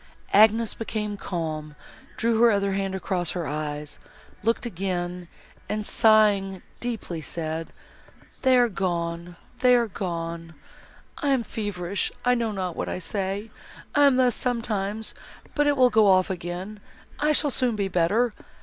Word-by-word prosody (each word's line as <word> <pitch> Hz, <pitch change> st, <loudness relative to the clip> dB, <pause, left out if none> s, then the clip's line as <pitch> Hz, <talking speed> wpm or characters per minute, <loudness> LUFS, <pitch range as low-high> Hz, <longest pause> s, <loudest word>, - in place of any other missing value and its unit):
Agnes 220 Hz, +2 st, +5 dB
became 215 Hz, -2 st, -3 dB
calm, 155 Hz, -6 st, -4 dB, 0.4 s
drew 230 Hz, 0 st, +1 dB
her 235 Hz, -, +7 dB
other 200 Hz, -2 st, +1 dB
hand 195 Hz, 0 st, -1 dB
across 180 Hz, -2 st, -2 dB
her 175 Hz, -3 st, -3 dB
eyes, 150 Hz, 0 st, -5 dB, 0.4 s
looked 230 Hz, +3 st, 0 dB
again, 180 Hz, -3 st, -3 dB, 0.4 s
and, 210 Hz, 0 st, -2 dB
sighing 205 Hz, -5 st, +3 dB, 0.2 s
deeply, 220 Hz, -9 st, -4 dB
said, 160 Hz, +1 st, -4 dB, 0.7 s
"They 260 Hz, -1 st, +5 dB
are 245 Hz, -1 st, +5 dB
gone—they 175 Hz, +5 st, -1 dB
are 235 Hz, -1 st, +2 dB
gone! 165 Hz, -4 st, -5 dB, 0.6 s
I 290 Hz, -, -2 dB
am 265 Hz, -4 st, +2 dB
feverish, 200 Hz, -4 st, -3 dB
I 250 Hz, -, +5 dB
know 230 Hz, -2 st, 0 dB
not 185 Hz, -4 st, -3 dB
what -, -, -3 dB
I -, -, -3 dB
say. 195 Hz, +4 st, -3 dB, 0.4 s
I 290 Hz, 0 st, +5 dB
am 275 Hz, -, +4 dB
thus, 255 Hz, -2 st, +3 dB
sometimes, 220 Hz, -3 st, -2 dB, 0.4 s
but 295 Hz, -1 st, +2 dB
it 290 Hz, -1 st, +2 dB
will 250 Hz, -1 st, +5 dB
go 215 Hz, -1 st, +5 dB
off 185 Hz, 0 st, +4 dB
again, 180 Hz, +4 st, -5 dB, 0.4 s
I 300 Hz, +1 st, +2 dB
shall 295 Hz, -1 st, +4 dB
soon 250 Hz, -3 st, +1 dB
be 200 Hz, -2 st, -1 dB
better. 195 Hz, +6 st, +2 dB
200 Hz, 145 wpm, -25 LUFS, 175-230 Hz, 0.7 s, her